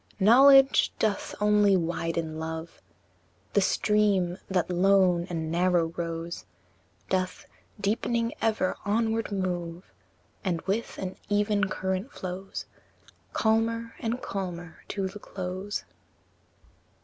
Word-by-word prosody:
V. 195 - 0
Knowledge 270 +4 +7
doth 210 -3 -1
only 210 -2 +4
widen 165 -2 -2
love; 160 +1 -6 0.7
The 200 - +4
stream, 195 -3 +2
that 185 -1 0
lone 180 -1 +4
and 160 -2 -3
narrow 170 -1 +2
rose, 170 0 -4 0.6
Doth, 185 -1 -1 0.3
deepening 230 +3 0
ever, 220 -4 +1
onward 225 +1 0
move, 180 -2 -3 0.5
And 180 -5 0
with 205 +4 -2
an 185 -1 -5
even 205 0 +2
current 190 +7 -2
flows 185 +1 -6 0.7
Calmer 230 +1 +1
and 235 +2 -2
calmer 175 -4 -5
to 195 -1 -2
the 200 +2 -9
close. 190 +1 -5
190 Hz, 105 wpm, -27 LUFS, 175-210 Hz, 0.7 s, Knowledge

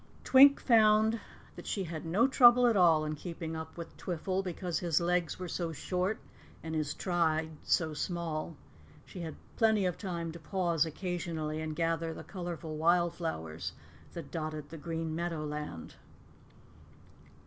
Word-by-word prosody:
Twink 275 +2 +7
found 220 -1 +4 0.4
that - - -10
she 195 - -1
had 165 -2 -6
no 205 +10 +3
trouble 250 -2 +7
at 235 -2 +4
all 165 -5 +5
in 155 - -2
keeping 165 +1 -6
up 160 +1 -7
with 170 -1 -8
Twiffle, 185 +1 -2
because 180 -1 -3
his 170 -4 +1
legs 175 -1 0
were 185 - -5
so 170 0 -3
short 180 +6 -1 0.5
and 160 -1 -5
his 155 -2 -1
stride 160 -3 0
so 160 -2 +1
small. 165 -1 -3 0.5
She 185 - -10
had 165 -3 -5 0.2
plenty 220 -4 +3
of 180 -2 -1
time 170 -4 -4
to 170 - -9
pause 170 -1 0
occasionally 160 -2 -3
and 155 -1 -4
gather 165 0 -1
the - - -8
colorful 175 -4 -6
wild 170 +2 +3
flowers 80 - -4 0.4
that 165 -5 -8
dotted 155 -3 -4
the 165 - -8
green 165 0 -3
meadowland. 150 - -4
170 Hz, 150 wpm, -31 LUFS, 160-180 Hz, 0.5 s, Twink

